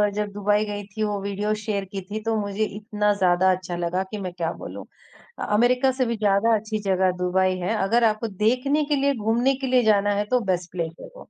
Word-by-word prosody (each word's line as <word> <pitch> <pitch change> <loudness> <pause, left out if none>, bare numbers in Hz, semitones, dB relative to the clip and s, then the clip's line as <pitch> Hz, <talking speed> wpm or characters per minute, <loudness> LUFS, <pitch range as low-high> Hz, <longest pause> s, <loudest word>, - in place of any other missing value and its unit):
जब 210 -1 -2
दुबई 205 +1 +1
गई 205 0 -5
थी 215 +2 -4
वो 205 -1 -1
वीडियो 200 +2 -1
शेयर 200 -3 -2
की 195 - -3
थी 215 +1 -3
तो 225 0 0
मुझे 205 +1 -2
इतना 210 -1 0
ज़्यादा 185 -1 +3
अच्छा 180 -1 -3
लगा 175 +2 -1
कि, 200 +3 -7
मैं 185 -2 -5
क्या 170 -2 -2
बोलूँ? - - -7 0.5
अ, - - -3
अमेरिका 250 +5 +3
से 255 -1 0
भी 230 -1 -2
ज़्यादा 210 +2 +3
अच्छी 215 0 -3
जगह 190 -1 +2
दुबई 185 +1 +1
है। 180 +5 -1
अगर 230 +4 +2
आपको 220 +1 +1
देखने 250 +9 +1
के - - +4
लिए, 280 0 +2
घूमने 235 +5 +1
के 265 0 -4
लिए 250 -1 +3
जाना 205 -1 +3
है 205 - 0
तो 250 - +5
बेस्ट 175 -1 -2
प्लेस 165 -2 -3
है - - -9
वो। - - -13
210 Hz, 230 wpm, -24 LUFS, 190-225 Hz, 0.5 s, तो